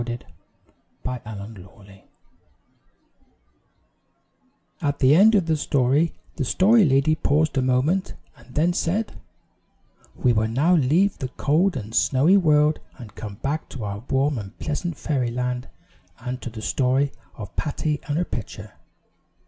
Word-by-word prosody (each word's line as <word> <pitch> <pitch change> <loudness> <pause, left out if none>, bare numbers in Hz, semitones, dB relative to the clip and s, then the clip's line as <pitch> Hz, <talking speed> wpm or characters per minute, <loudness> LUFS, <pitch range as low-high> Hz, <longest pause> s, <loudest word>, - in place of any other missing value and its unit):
XXIV 120 0 -4 0.8
PATTY 125 -4 -5
AND 105 0 -8
HER - - -10
PITCHER 95 +1 -17 2.8
AT 145 -1 0
the 135 0 +5
end 215 +5 +6
of 190 -5 +3
the 160 -1 +1
story 145 +2 +1 0.2
the 145 - 0
Story 210 - +4
Lady 140 +2 +3
paused 155 0 +1
a 135 - +2
moment, 130 +9 +1 0.2
and - - -18
then 165 +3 +2
said: 175 - -2 0.9
"We 125 - +2
will 110 0 +1
now 140 +10 +2
leave 170 +6 +2
the 130 - -3
cold 155 +6 +1
and 110 -2 -7
snowy 145 +11 +4
world 150 -4 +3 0.2
and 115 -6 -11
come 105 -3 -7
back 150 +3 -2
to 125 - -7
our 100 -1 -4
warm 135 0 +1
and 100 0 -10
pleasant 155 +1 -3
Fairyland 125 -2 -2 0.5
and 125 +1 -6
to - - -5
the 110 -1 -9
story 135 +3 +1 0.2
of 105 -4 -9
Patty 150 0 -2
and 145 0 -1
her 175 - 0
Pitcher." 105 -5 -7
135 Hz, 145 wpm, -23 LUFS, 120-155 Hz, 2.8 s, end